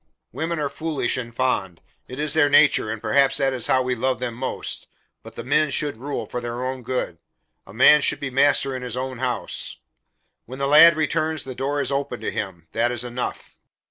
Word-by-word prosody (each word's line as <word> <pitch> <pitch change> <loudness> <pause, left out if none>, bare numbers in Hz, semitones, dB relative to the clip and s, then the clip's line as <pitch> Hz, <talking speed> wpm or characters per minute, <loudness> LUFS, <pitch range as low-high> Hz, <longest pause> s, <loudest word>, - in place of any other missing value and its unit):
"Women 165 +2 -3
are 150 -2 -1
foolish 155 +1 -2
and 120 -2 -5
fond. 110 -8 -1 0.3
It 125 - -9
is 150 0 0
their 155 -2 +4
nature, 140 -6 +4
and 110 0 -4
perhaps 135 +6 +2
that 135 -2 +1
is 125 -3 0
how 130 -1 +3
we 125 0 -1
love 130 +2 -1
them 125 -2 -3
most, 130 +3 -4 0.3
but - - -13
the - - -6
men 150 +4 +2
should 145 -2 -1
rule, 140 +4 -4
for 125 - -5
their 120 +1 -4
own 130 0 -4
good. 125 -9 -3 0.5
A 95 - -12
man 150 +5 +7
should - - +1
be 135 -2 -4
master 135 0 +2
in 130 - -5
his 125 -1 -5
own 130 -1 -4
house. 125 -1 -3 0.7
When 130 +3 -8
the 140 - -1
lad 155 +3 +8
returns, 155 -1 -1
the 130 - -7
door 140 +3 -2
is 140 - -2
open 140 -3 -2
to - - -3
him. 85 -5 -5
That 120 +2 +1
is 120 -1 -3
enough." 125 0 -6
130 Hz, 210 wpm, -23 LUFS, 120-145 Hz, 0.7 s, lad